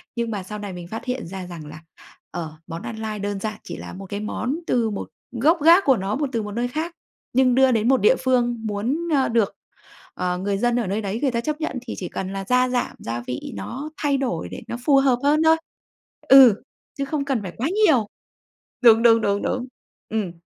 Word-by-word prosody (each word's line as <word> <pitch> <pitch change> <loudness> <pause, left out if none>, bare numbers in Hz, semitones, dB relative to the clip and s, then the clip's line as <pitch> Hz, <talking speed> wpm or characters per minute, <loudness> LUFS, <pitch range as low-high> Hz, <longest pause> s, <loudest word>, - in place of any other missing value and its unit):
nhưng 235 -1 -2
mà 200 -3 -3
sau 210 +3 -7
này 205 -2 -6
mình 175 -1 -8
phát 225 +6 -7
hiện 250 -6 -3
ra 185 0 -7
rằng 165 -4 -8
là, 155 +2 -10 0.5
ờ, 165 -3 -5
món 165 0 -6
ăn 230 - -6
lai 215 -1 -4
đơn 205 0 -3
giản 215 +1 -4
chỉ - - -7
là - - -8
một 195 +1 -8
cái 205 - -3
món 245 +6 -2
từ 235 -2 +2
một 205 - -5 0.3
gốc 320 +6 +5
gác 340 +5 +7
của 270 -3 +5
nó, 195 +3 -2
một 285 -1 -1
từ 230 -3 -1
một 210 - -6
nơi 240 +3 -1
khác, 315 +7 -3 0.4
nhưng 255 -1 +4
đưa 265 0 +5
đến 225 -1 +1
một 265 -1 +4
địa - - +5
phương 245 -2 +2
muốn, 245 +12 -2
ơ, 270 -2 +3
được, 225 -4 +1 0.6
ờ, 180 0 -2
người 195 +2 -1
dân 240 +3 +1
ở 230 - -2
nơi 205 +4 -1
đấy 205 +3 -3
người 275 -3 +2
ta 235 -1 -1
chấp 305 +4 -3
nhận, 265 -5 -2
thì - - -4
chỉ 180 - -5
cần 190 +1 -4
là 195 0 -4
gia 250 +3 +3
giảm 250 -1 -1
gia 115 +1 -4
vị 125 - -5
nó 255 - -6
thay 285 -2 +1
đổi 180 - -2
để - - -7
nó 235 - -4
phù 285 - +5
hợp 265 -3 +3
hơn 300 +2 +3
thôi. 320 0 +5 0.7
Ừ, 260 -6 +8 0.3
chứ 275 - -1
không 280 0 -2
cần 270 -5 0
phải 185 -3 -7
quá 255 - 0 0.2
nhiều, 245 -9 +3 0.8
đúng, 230 -2 +7
đúng, 230 -1 +6
đúng, 200 -1 0
đúng. 255 0 -2 0.4
Ừm, 215 -5 -2
230 Hz, 235 wpm, -23 LUFS, 200-265 Hz, 0.8 s, Ừ